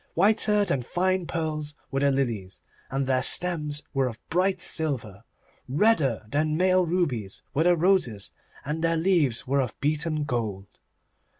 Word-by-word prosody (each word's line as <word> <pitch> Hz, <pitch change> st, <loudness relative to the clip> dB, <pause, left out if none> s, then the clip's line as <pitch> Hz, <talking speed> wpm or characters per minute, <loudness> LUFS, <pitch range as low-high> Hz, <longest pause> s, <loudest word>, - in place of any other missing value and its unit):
Whiter 210 Hz, +2 st, +3 dB
than 140 Hz, -9 st, 0 dB
fine 185 Hz, +6 st, -1 dB
pearls 155 Hz, -3 st, -3 dB, 0.2 s
were 135 Hz, -, 0 dB
the 140 Hz, 0 st, +3 dB
lilies, 115 Hz, -9 st, -2 dB, 0.3 s
and 135 Hz, +1 st, -1 dB
their 130 Hz, -1 st, +1 dB
stems 150 Hz, -1 st, +2 dB
were 135 Hz, -2 st, +1 dB
of 115 Hz, -2 st, -7 dB
bright 185 Hz, +3 st, +1 dB
silver. 125 Hz, -, -3 dB, 0.4 s
Redder 140 Hz, -, +2 dB
than 155 Hz, +5 st, 0 dB
male 185 Hz, 0 st, +3 dB
rubies 135 Hz, -, -1 dB
were 155 Hz, +4 st, +1 dB
the 175 Hz, 0 st, +5 dB
roses, 160 Hz, -, +1 dB, 0.3 s
and 155 Hz, +3 st, -3 dB
their 165 Hz, 0 st, +2 dB
leaves 160 Hz, -9 st, +2 dB
were 140 Hz, +2 st, +1 dB
of 125 Hz, -4 st, -5 dB
beaten 155 Hz, +1 st, -1 dB
gold. 110 Hz, -8 st, -4 dB
150 Hz, 145 wpm, -26 LUFS, 130-175 Hz, 0.4 s, the